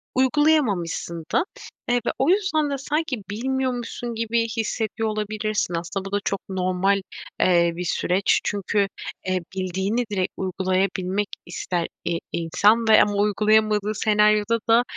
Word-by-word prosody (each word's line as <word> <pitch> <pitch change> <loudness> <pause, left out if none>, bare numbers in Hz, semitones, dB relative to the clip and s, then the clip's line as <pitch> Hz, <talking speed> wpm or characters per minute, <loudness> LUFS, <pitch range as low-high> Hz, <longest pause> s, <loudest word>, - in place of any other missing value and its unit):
uygulayamamışsın 255 - +1
da, - - +3 0.4
eee, 245 - +3
ve - - +1
o 270 - +2
yüzden 365 -6 +2
de 280 - -2
sanki 295 0 -2
bilmiyormuşsun 245 0 -2
gibi 230 +1 0
hissediyor 220 0 -1
olabilirsin. 215 -2 -2
Aslında 175 +3 -4
bu 195 - -6
da 205 - +1
çok 195 - 0
normal, 190 +1 +1 0.4
eee, 170 -1 +4
bir 180 - -4
süreç. 180 +3 +1
Çünkü, 200 0 0 0.4
eee, 185 0 +1 0.2
bildiğini 190 +5 -1
direkt 185 -3 -1
uygulayabilmek 190 +1 -1 0.2
ister, 175 -1 -3 0.2
i 170 -1 0
insan 205 +7 +2
ve 220 - +7
ama 205 - +2
uygulayamadığı 210 0 +2
senaryoda 210 +1 +3
da, 230 +2 +6
210 Hz, 130 wpm, -23 LUFS, 185-230 Hz, 0.4 s, ve